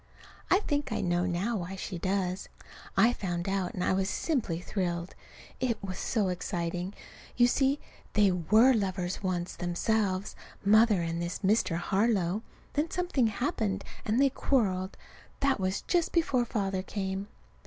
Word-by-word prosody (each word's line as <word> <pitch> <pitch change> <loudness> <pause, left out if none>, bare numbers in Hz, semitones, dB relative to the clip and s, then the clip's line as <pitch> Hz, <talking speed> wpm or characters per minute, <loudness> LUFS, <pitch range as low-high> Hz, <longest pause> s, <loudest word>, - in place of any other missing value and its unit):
I 380 - +5
think 290 -6 -1
I - - -1
know 175 0 +1
now 190 +6 0
why 180 +1 -5
she 185 -1 -5
does. 185 0 -1 0.5
I 230 +5 +6
found 175 -4 -3
out, 195 -2 -1
and 180 - -1
I - - +2
was 190 +1 +1
simply 235 - -1
thrilled. 175 -2 -2 0.5
It 240 -4 0
was 185 -2 -4
so 210 -6 0
exciting! 175 +1 -3 0.4
You 240 - +7
see, 270 +3 +2 0.3
they 205 -2 +5
were 215 +9 +5
lovers 190 -4 -1
once 180 -2 -2
themselves 190 +2 0 0.3
Mother 215 -2 +5
and 165 0 -2
this 170 +1 -3
Mr. 200 -4 +3
Harlow. 195 0 +1 0.3
Then 300 +3 0
something 350 -10 +1
happened 210 -3 -1 0.2
and 220 +3 +1
they 275 -1 +4
quarreled. 195 -10 0 0.4
That 275 -4 +2
was 190 +1 -1
just 345 -2 +1
before 275 -8 +2
Father 195 -5 -1
came. 190 0 -3
195 Hz, 150 wpm, -30 LUFS, 180-230 Hz, 0.5 s, You